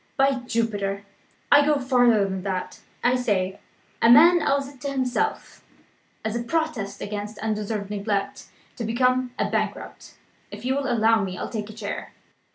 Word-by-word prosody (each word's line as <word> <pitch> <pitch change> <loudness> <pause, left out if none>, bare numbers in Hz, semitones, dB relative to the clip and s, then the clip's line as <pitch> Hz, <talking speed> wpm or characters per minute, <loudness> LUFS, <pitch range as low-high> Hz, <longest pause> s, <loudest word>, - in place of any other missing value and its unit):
By 270 -1 +3
Jupiter, 200 -4 -1 0.5
I 290 0 +8
go 300 0 +3
farther 245 -5 +3
than 190 -1 -3
that! 185 -1 -4 0.2
I 250 +1 +4
say, 200 -6 -1 0.4
a 230 - +5
man 335 +8 +8
owes 280 -2 +1
it 275 -2 -15
to 280 - -3
himself 270 - -2 0.6
(as 220 +1 -2
a 235 - -1
protest 245 -7 -2
against 205 +1 -5
undeserved 210 -1 -3
neglect) 200 -1 -2 0.3
to 235 - -4
become 250 +2 +1
a - - 0
bankrupt. - - -4 0.3
If - - -9
you 260 - +1
will 275 -1 -1
allow 225 -2 +3
me, 185 -1 -4
I'll - - -4
take 215 -2 -5
a - - -9
chair." 210 -2 -6
230 Hz, 165 wpm, -24 LUFS, 205-260 Hz, 0.6 s, I